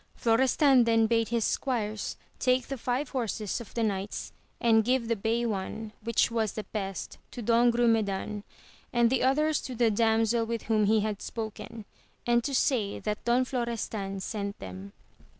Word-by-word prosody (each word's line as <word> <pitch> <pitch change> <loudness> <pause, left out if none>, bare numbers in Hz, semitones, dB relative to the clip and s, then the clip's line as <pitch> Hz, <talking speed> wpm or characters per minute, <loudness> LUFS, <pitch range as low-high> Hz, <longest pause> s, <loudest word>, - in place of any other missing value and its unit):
Florestan 255 +2 +4
then 225 -1 +4
bade 230 0 +2
his 235 -2 0
squires 220 -5 -2 0.2
take 255 -1 +2
the 275 - -3
five 250 +4 -1
horses 225 -4 -2
of 230 - -11
the 230 - +1
knights 200 -1 -3 0.3
and 225 -1 +4
give 245 0 +1
the 230 - +1
bay 225 +3 0
one, 215 +1 -3
which 230 0 +2
was 220 -3 0
the 215 - -4
best, 195 -3 -5
to - - -9
Don 235 +1 +4
Grumedan, 220 -4 +1 0.5
and 235 -1 +3
the 265 - +2
others 300 +4 +2
to 255 - -6
the 230 -1 +3
damsel 225 +1 +2
with 230 0 -3
whom 215 -2 +2
he 215 +1 +3
had 210 -1 -3
spoken, 220 0 -6 0.4
and 240 0 +3
to 275 +1 -2
say 225 -6 +1
that 210 -1 -4
Don 245 +2 +3
Flo 250 -1 -1
restan 210 -4 -4
sent 200 +1 -4
them. 95 +1 -9
230 Hz, 170 wpm, -28 LUFS, 210-240 Hz, 0.5 s, Florestan